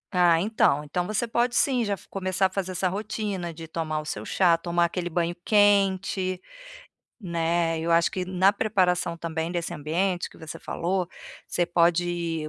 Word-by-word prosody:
Ah, 175 -2 +5
então, 175 -7 +2
então 175 +4 -2
você 215 +3 -1
pode, 240 +1 0
sim, 255 -4 +2
já 205 -2 -1
f 195 - -8
começar 190 0 -1
a - - +3
fazer 190 -1 -3
essa 185 +1 0
rotina 200 -2 -3
de 165 0 -9
tomar 155 -1 -3
o 150 - -7
seu 105 -7 -4
chá, 175 - +3
tomar 170 0 +1
aquele 175 0 -3
banho 170 +1 -1
quente, 195 -2 +2 0.8
né. 165 -2 0
Eu 165 - -2
acho 170 0 +4
que 185 -1 -3
na 185 +2 +3
preparação 180 -5 +1
também 165 0 -3
desse 175 0 -3
ambiente 175 +4 -1
que - - -17
você 160 +1 -8
falou, 180 +1 -2 0.4
você 175 - -1
pode 170 -2 +1
175 Hz, 175 wpm, -26 LUFS, 165-195 Hz, 0.8 s, Ah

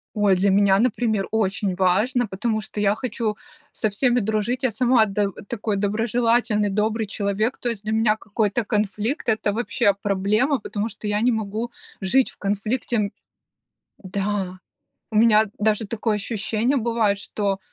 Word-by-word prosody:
Ой, 205 -2 +4
для 195 +2 +2
меня, 195 0 +4
например, 225 -3 +1
очень 200 -3 0
важно, 210 +7 +2
потому 215 +3 -2
что 210 - -6
я 205 0 +3
хочу 220 -2 -3 0.4
со 215 - 0
всеми 245 +4 +2
дружить, 220 +4 -1
я 260 - +2
сама 235 0 +3
до 200 0 0 0.2
такой 215 -2 -2
доброжелательный, 225 +1 +1
добрый 215 +2 0
человек, 205 +3 -1
то 245 - -2
есть 220 -4 -5
для 215 0 -3
меня 220 -1 +3
какой-то 215 +1 -1
конфликт- 210 - -1
это 215 -2 0
вообще 230 -2 +1
проблема, 210 +8 +1
потому 210 +1 -3
что 220 - -9
я 210 0 0
не 245 +1 +3
могу 220 +2 -3 0.3
жить 225 +7 +2
в - - -15
конфликте, 215 +5 -1
м 205 -2 0 0.9
Да, 190 -1 -3 0.5
у 215 - -3
меня 220 -1 +5
даже 215 0 +1
такое 220 0 -1
ощущение 220 +4 -1
бывает, 230 -4 +1
что 200 -1 -2
215 Hz, 155 wpm, -23 LUFS, 200-230 Hz, 0.9 s, меня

